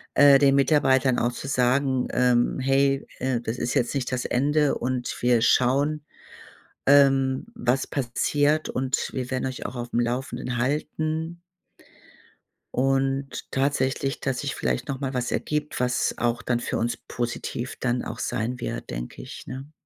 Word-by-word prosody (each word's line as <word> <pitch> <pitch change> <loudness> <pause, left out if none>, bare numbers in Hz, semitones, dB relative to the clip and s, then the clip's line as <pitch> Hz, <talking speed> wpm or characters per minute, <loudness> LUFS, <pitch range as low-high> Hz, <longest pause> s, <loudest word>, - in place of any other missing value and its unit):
äh, 140 -1 +7
den 140 -1 +5
Mitarbeitern 135 -3 +3
auch 120 +1 +1
zu 135 - -7
sagen, 130 0 +1
ähm: 125 0 +2
„Hey, 135 +1 +2
äh, 130 -1 0
das 115 +1 -4
ist 125 - -1
jetzt 120 - +1
nicht 135 -2 -2
das 125 -1 -2
Ende 145 +3 +2
und 125 0 -2
wir 120 -2 +3
schauen, 140 +5 +2 0.8
ähm, 135 0 +4
was 130 - 0
passiert 145 +4 +1
und 130 +1 -1
wir 130 0 -4
werden 130 0 -1
euch 130 -1 -5
auch - - -5
aufm 120 0 -2
Laufenden 125 0 -2
halten.“ 155 +5 -2 1.4
Und 135 +1 0
tatsächlich, 135 +1 0
dass 135 -2 -2
sich - - -3
vielleicht 65 -1 -1
noch 135 -1 -3
mal 135 -1 -3
was 125 -1 -2
ergibt, 150 -2 -2
was 125 -1 +1
auch 120 0 0
dann 120 -1 0
für - - -2
uns 120 +1 -1
positiv 120 0 -4
dann 125 -1 0
auch 110 - -6
sein 125 +1 -2
wird, - - -5
denke - - -6
ich, - - -9
ne? 135 +4 -8
130 Hz, 155 wpm, -25 LUFS, 125-140 Hz, 1.4 s, äh